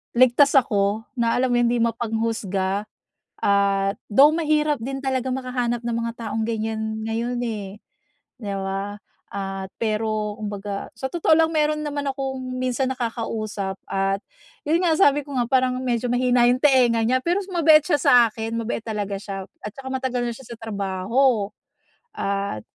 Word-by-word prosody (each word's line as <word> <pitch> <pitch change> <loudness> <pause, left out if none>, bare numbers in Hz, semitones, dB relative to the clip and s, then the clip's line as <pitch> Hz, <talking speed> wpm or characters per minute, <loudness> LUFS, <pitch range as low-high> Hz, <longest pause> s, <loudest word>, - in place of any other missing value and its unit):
ligtas 255 +4 +5
ako, 210 -4 +2
na 235 -2 +1
alam 255 0 +1
yon 240 -1 +3
hindi 240 - +1
mapanghusga, 220 -4 -1 0.6
at 200 -1 +2
though 280 +8 +7
mahirap 305 -2 +1
din 270 +2 -3
talagang 260 -1 -1
makahanap 245 -2 -2
ng 235 -1 -1
mga 230 0 -2 0.2
taong 220 +2 -2
ganyan 220 -1 -3
ngayon, 235 +2 -2
eh, 205 -2 -5 0.6
'di 200 -2 -3
ba? 195 +2 -4 0.3
Ah, 195 -1 -4 0.2
pero 215 -1 -1
kumbaga, 205 -1 -5
sa 265 - -4
totoo 340 -2 +2
lang 325 0 +4
meron 305 0 +2
naman 290 -1 -3
akong 270 -1 -3 0.2
minsan 255 +1 0
nakakausap 225 -5 -3
at 195 0 0 0.4
'yun 310 +3 +2
nga 335 - +3
sabi 290 -5 +4
ko 285 - -9
nga 245 - +2
parang 255 -1 +2
medyo 245 -1 0
mahina 245 -1 +3
yung 250 +1 +2
tenga 250 -5 +4
niya 255 +3 +2
pero 350 +3 +1
mabait 320 -3 +6
siya 340 - +2
sa - - +4 0.2
akin, 225 +1 -5
mabait 230 0 -3
talaga 205 -3 -3
siya 195 -2 -6 0.2
at 210 - -5
saka 270 -1 -8
matagal 260 -2 -1
na 235 - -3
siya 255 -3 -12
sa - - -13
trabaho, 205 +2 0 0.7
at 200 - -2
230 Hz, 160 wpm, -23 LUFS, 205-260 Hz, 0.7 s, though